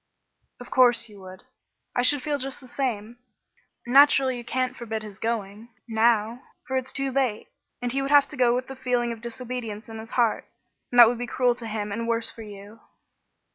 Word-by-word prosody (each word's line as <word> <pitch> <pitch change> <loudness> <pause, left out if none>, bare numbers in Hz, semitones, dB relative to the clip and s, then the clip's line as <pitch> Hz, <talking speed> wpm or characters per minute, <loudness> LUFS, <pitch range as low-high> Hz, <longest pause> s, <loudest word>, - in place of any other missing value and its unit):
"Of 245 - -11
course 245 -2 +4
you 205 -1 -14
would. 185 0 -12 0.5
I 245 - +2
should 260 +2 +3
feel 290 -1 -1
just 270 0 -3
the 260 - -13
same. 240 -3 -3 0.7
Naturally 270 0 +5
you 240 - -7
can't 255 +1 -2
forbid 225 -3 -5
his 210 -1 -10
going, 225 -1 -4 0.2
now, 225 +1 +2 0.2
for 265 - -3
it's 260 0 -2
too 275 -1 -2
late, 255 -5 -1 0.3
and 245 - -1
he 275 +2 -1
would 275 - -2
have 290 -1 +6
to - - -8
go 245 -2 +3
with 255 +1 -2
the 270 - -9
feeling 245 -2 -1
of 230 -1 -7
disobedience 235 -2 -6
in 225 0 -7
his 225 +1 -9
heart, 235 -3 +2 0.5
and 245 - -2
that 240 -1 +11
would 240 +1 -1
be 245 - -4
cruel 250 -1 +2
to 235 -1 -8
him, 210 -1 -4
and 230 +3 -3
worse 230 0 0
for 230 - -12
you." 205 +1 -11
240 Hz, 205 wpm, -25 LUFS, 220-255 Hz, 0.7 s, that